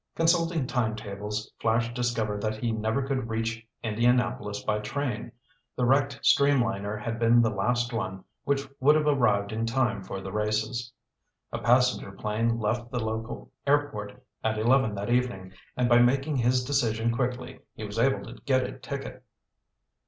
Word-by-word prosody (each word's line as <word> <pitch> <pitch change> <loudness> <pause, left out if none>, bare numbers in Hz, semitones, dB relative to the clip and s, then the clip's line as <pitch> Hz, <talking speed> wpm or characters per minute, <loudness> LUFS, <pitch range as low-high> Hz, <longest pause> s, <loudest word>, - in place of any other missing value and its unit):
Consulting 165 -2 +2
time 120 -3 0
tables, 105 0 -5
Flash 115 +1 +1
discovered 115 -4 -1
that 110 0 -1
he 115 +1 -2
never 110 +4 0
could 130 -3 -2
reach 115 0 -2 0.2
Indianapolis 115 -2 +1
by 105 -1 0
train. 120 +1 -3 0.4
The 125 - +1
wrecked 135 +2 +2
streamliner 115 -7 +3
had 115 +1 -4
been 120 +1 +5
the 110 - +2
last 120 +4 0
one 95 -4 -3 0.2
which 140 0 0
would 145 +3 +5
have 155 -1 +2
arrived 110 -8 +2
in 110 +1 -1
time 115 -3 +1
for 95 - -5
the 95 0 -7
races. 110 +3 -1 0.6
A - - -3
passenger 125 -3 +3
plane 110 +3 -1
left 120 +2 -1
the 125 - -4
local 110 +2 -4 0.2
airport 140 -7 0 0.2
at 110 0 0
eleven 120 0 +3
that 100 +3 -3
evening 120 -7 0 0.2
and 125 -1 +2
by 120 0 +6
making 135 +4 +3
his 125 +1 +2
decision 115 -4 +1
quickly 125 0 -3 0.2
he - - -7
was 105 +1 -4
able 135 +3 +2
to - - -11
get 130 -2 +3
a - - -6
ticket. - - -6
115 Hz, 160 wpm, -27 LUFS, 110-125 Hz, 0.6 s, by